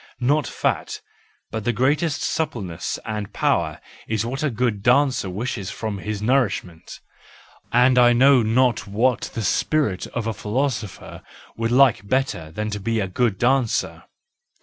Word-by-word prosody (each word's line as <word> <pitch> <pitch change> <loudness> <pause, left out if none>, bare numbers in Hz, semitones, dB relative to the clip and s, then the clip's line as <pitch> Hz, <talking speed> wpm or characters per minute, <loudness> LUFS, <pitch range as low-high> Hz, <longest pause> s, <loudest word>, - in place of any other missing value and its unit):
Not 145 +4 +1
fat, - - -2 0.5
but 110 -1 -4
the 120 - +1
greatest 145 +6 0
suppleness 115 - -3
and 105 -2 -4
power - - 0 0.3
is 110 0 -1
what 135 +3 -4
a 155 - +1
good 115 -4 -1
dancer 125 -2 +2
wishes 100 0 -4
from 110 -3 -4
his 105 +1 -4
nourishment,—and 125 +2 -1
I 120 -1 +6
know 130 +2 +5
not 115 0 +1
what 115 +5 0
the 115 - -2
spirit 105 - 0
of 120 -2 -4
a 115 - -1
philosopher 110 -1 -3 0.3
would 115 0 -2
like 125 -6 +4
better 130 - -1
than 105 +7 -4
to 105 - -3
be 115 +3 -1
a 95 - -1
good 105 +1 0
dancer. 125 0 0
115 Hz, 145 wpm, -22 LUFS, 105-130 Hz, 0.5 s, I